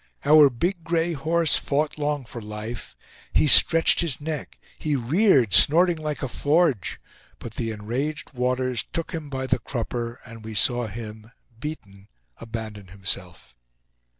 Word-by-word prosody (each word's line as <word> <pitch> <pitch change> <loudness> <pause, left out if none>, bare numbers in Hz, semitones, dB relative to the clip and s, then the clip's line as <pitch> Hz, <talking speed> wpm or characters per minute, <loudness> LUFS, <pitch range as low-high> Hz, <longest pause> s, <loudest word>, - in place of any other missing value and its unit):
Our 150 -1 +7
big 170 +8 -3
gray 170 0 0
horse 160 +2 +2
fought 150 +2 -2
long 145 -2 -2
for 120 0 -9
life. 105 +2 -8 0.4
He - - +3
stretched 165 +3 +6
his 165 -7 0
neck, 155 0 -6 0.2
he 150 -2 -1
reared, 135 - +2
snorting 170 - +6
like 150 -2 -4
a - - -1
forge. 145 - 0 0.4
But 115 - -9
the 115 0 -3
enraged 125 +9 -4
waters 125 -1 -1
took 165 - -5
him 155 -3 -6
by 130 -1 -4
the 130 -1 0
crupper, 120 0 -5
and 115 -1 -12
we 110 0 -8
saw 120 +2 +2
him, 110 0 -9 0.3
beaten, 100 -10 -8 0.3
abandon 110 -3 -7
himself. 90 -8 -4
130 Hz, 145 wpm, -24 LUFS, 110-155 Hz, 0.4 s, Our